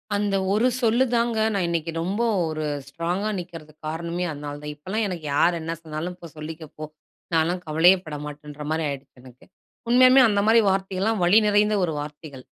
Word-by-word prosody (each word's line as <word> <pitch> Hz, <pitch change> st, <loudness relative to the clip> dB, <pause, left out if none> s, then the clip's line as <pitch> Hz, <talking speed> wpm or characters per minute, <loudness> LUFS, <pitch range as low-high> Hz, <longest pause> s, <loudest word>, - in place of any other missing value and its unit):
அந்த 205 Hz, -1 st, 0 dB, 0.2 s
1 220 Hz, +4 st, +3 dB
சொல்லு 235 Hz, +2 st, +3 dB
தாங்க, 235 Hz, -1 st, +1 dB, 0.2 s
நான் 195 Hz, -3 st, 0 dB
இன்னைக்கு 165 Hz, -1 st, -2 dB
ரொம்ப 195 Hz, +7 st, -2 dB, 0.3 s
ஒரு 155 Hz, -1 st, -3 dB, 0.2 s
ஸ்ட்ராங்கா 175 Hz, +8 st, -2 dB
நிக்கறதுக்குக் 155 Hz, -3 st, -10 dB
காரணமே 170 Hz, +2 st, -3 dB
அதனாலதான். 145 Hz, 0 st, -6 dB
இப்பல்லாம் 190 Hz, +9 st, -2 dB
எனக்கு 175 Hz, -5 st, -6 dB
யார் 170 Hz, +3 st, +3 dB
என்ன 165 Hz, +1 st, -3 dB
சொன்னாலும், 160 Hz, +2 st, -5 dB
போ 175 Hz, -, -11 dB
சொல்லிக்க 155 Hz, +1 st, -7 dB
போ! 155 Hz, -, -6 dB, 0.5 s
நான்லாம் 170 Hz, +3 st, +1 dB
கவலையே 165 Hz, +5 st, +5 dB
பட 155 Hz, -2 st, -6 dB
மாட்டேன்ன்ற 150 Hz, 0 st, -9 dB
மாரி 160 Hz, 0 st, 0 dB
ஆயிடுச்சு 140 Hz, -1 st, -8 dB
எனக்கு. 125 Hz, -1 st, -16 dB, 0.4 s
உண்மையாலுமே 255 Hz, +2 st, +7 dB
அந்த 205 Hz, -2 st, +1 dB
மாரி 230 Hz, +1 st, +6 dB
வார்த்தைகள்லாம் 195 Hz, +2 st, 0 dB
வலிநிறைந்த 210 Hz, +2 st, +4 dB
ஒரு 165 Hz, -3 st, 0 dB
வார்த்தைகள். 145 Hz, -2 st, -8 dB
170 Hz, 160 wpm, -24 LUFS, 155-205 Hz, 0.5 s, உண்மையாலுமே